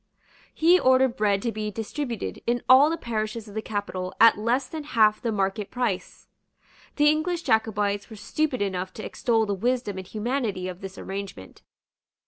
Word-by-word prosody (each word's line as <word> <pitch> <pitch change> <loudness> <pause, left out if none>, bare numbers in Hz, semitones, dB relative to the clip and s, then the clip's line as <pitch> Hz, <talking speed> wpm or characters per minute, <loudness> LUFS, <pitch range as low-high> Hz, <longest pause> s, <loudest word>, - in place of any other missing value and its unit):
He 345 +3 +4
ordered 260 -1 +4
bread 200 -2 +1
to 235 - 0
be 215 -1 -3
distributed 230 +3 -5
in 240 0 0
all 265 +4 +7
the 330 - -1
parishes 220 -2 -4
of 205 - -11
the 220 - -3
capital 200 -4 -4
at 230 - +8
less 235 +5 0
than 315 +1 -7
half 215 -6 +3
the 230 - -1
market 195 0 -1
price. 240 -7 -3 0.7
The 295 0 +4
English 325 +3 +1
Jacobites 210 -2 0
were 220 - -9
stupid 255 +3 -1
enough 185 -1 -3
to 215 - -7
extol 225 -2 +1
the 205 - -1
wisdom 230 -1 -1
and 185 - -9
humanity 215 -4 -2
of 185 0 -7
this 195 0 -8
arrangement. 190 - -7
220 Hz, 170 wpm, -25 LUFS, 200-255 Hz, 0.7 s, at